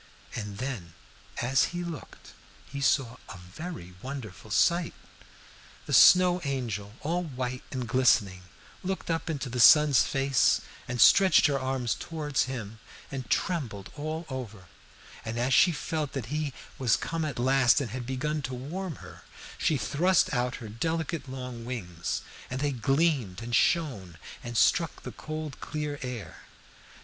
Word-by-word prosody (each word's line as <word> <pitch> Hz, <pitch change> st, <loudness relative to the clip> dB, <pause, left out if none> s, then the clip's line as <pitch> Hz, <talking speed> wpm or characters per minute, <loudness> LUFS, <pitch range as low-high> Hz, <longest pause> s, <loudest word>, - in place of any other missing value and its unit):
And 105 Hz, -3 st, -5 dB
then, 110 Hz, -11 st, -5 dB, 0.5 s
as 130 Hz, +2 st, +3 dB
he 175 Hz, -, -2 dB
looked, 170 Hz, -4 st, -9 dB, 0.3 s
he 140 Hz, 0 st, -7 dB
saw 130 Hz, -3 st, +1 dB
a -, -, -8 dB
very 90 Hz, -, -8 dB
wonderful 125 Hz, -6 st, -7 dB
sight. 170 Hz, +9 st, +2 dB, 0.9 s
"The -, -, -4 dB
Snow 180 Hz, 0 st, +7 dB
Angel, 115 Hz, -8 st, -3 dB
all 170 Hz, +4 st, -1 dB
white 130 Hz, -5 st, -4 dB
and 125 Hz, -3 st, -4 dB
glistening, 115 Hz, -7 st, +3 dB, 0.4 s
looked 190 Hz, -2 st, -3 dB
up 165 Hz, +1 st, -2 dB
into 145 Hz, -4 st, -3 dB
the 125 Hz, 0 st, -4 dB
sun's 145 Hz, +3 st, +7 dB
face 135 Hz, -1 st, +2 dB, 0.3 s
and 125 Hz, 0 st, -4 dB
stretched 190 Hz, +2 st, +7 dB
her 140 Hz, -2 st, +2 dB
arms 130 Hz, -4 st, -1 dB
towards 150 Hz, +2 st, -2 dB
him 115 Hz, -4 st, -6 dB, 0.3 s
and 135 Hz, -2 st, -5 dB
trembled 120 Hz, -, -2 dB
all 155 Hz, +3 st, -4 dB
over; 115 Hz, -8 st, -7 dB, 0.6 s
and 115 Hz, +1 st, -4 dB
as 125 Hz, +2 st, +1 dB
she 180 Hz, -, +6 dB
felt 155 Hz, -2 st, -3 dB
that 135 Hz, -5 st, -3 dB
he 150 Hz, -2 st, -1 dB, 0.3 s
was 125 Hz, -4 st, +3 dB
come 165 Hz, -1 st, -3 dB
at 150 Hz, -5 st, -3 dB
last 130 Hz, +1 st, +4 dB
and 130 Hz, -7 st, -4 dB
had 125 Hz, 0 st, -5 dB
begun 150 Hz, +4 st, -2 dB
to 130 Hz, -2 st, -4 dB
warm 160 Hz, +7 st, -5 dB
her, -, -, -13 dB, 0.4 s
she 155 Hz, -, +2 dB
thrust 170 Hz, +6 st, +2 dB
out 125 Hz, 0 st, 0 dB
her 115 Hz, -, -8 dB
delicate 160 Hz, +5 st, -3 dB
long 125 Hz, -2 st, -6 dB
wings, 90 Hz, -9 st, -4 dB, 0.3 s
and 130 Hz, -, -3 dB
they 145 Hz, +1 st, 0 dB
gleamed 135 Hz, -, +1 dB
and 120 Hz, +1 st, -6 dB
shone 115 Hz, -, +1 dB, 0.3 s
and 120 Hz, -1 st, -4 dB
struck 165 Hz, +6 st, +2 dB
the -, -, -6 dB
cold 155 Hz, -2 st, -6 dB
clear 150 Hz, -2 st, -4 dB
air. 120 Hz, -, -6 dB
130 Hz, 150 wpm, -28 LUFS, 120-155 Hz, 0.9 s, Snow